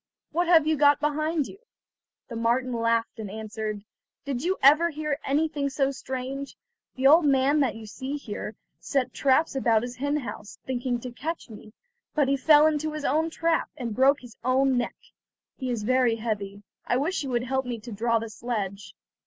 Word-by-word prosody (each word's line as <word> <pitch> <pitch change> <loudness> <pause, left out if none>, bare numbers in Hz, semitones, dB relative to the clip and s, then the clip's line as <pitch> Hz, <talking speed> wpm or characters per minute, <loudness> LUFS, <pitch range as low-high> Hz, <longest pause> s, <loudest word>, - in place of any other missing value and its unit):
what 345 +2 0
have 330 -3 +6
you 315 0 +2
got 290 0 +5
behind 305 +1 0
you?" 390 - -11 0.7
The 235 - -7
marten 240 +2 0
laughed 230 0 0
and 210 -2 -5
answered: 215 0 -5 0.4
"Did 275 -2 -3
you 370 +3 0
ever 305 +5 +6
hear 300 -2 -3
anything 290 0 0
so 275 0 0
strange? 265 +1 -5 0.4
The 265 - -2
old 315 +5 +7
man 275 +1 +3
that 270 -5 +1
you 225 0 -9
see 265 +6 -5
here 210 -4 -6 0.2
set 270 -3 -1
traps 280 +3 +2
about 230 -4 +2
his 245 0 -6
hen 285 +3 0
house, 220 -6 -7
thinking 245 -1 -2
to 250 - -6
catch 310 +1 -5
me 215 0 -12 0.4
but 295 -3 +3
he 275 - +3
fell 295 +2 +6
into 310 0 +1
his 305 -2 -5
own 315 +4 +1
trap, 330 0 0
and 240 -5 -4
broke 275 +5 +4
his 245 -2 -13
own 260 +1 +3
neck. 245 -1 -1 0.6
He 260 -2 -4
is 235 -4 -2
very 250 0 +3
heavy; 205 -3 -4 0.2
I 245 - +2
wish 315 +8 -1
you 275 - -4
would 240 -1 0
help 265 0 -1
me 240 -2 -3
to 240 - -9
draw 230 +2 +1
the 225 0 -4
sledge." 205 -4 -4
260 Hz, 190 wpm, -26 LUFS, 230-295 Hz, 0.7 s, old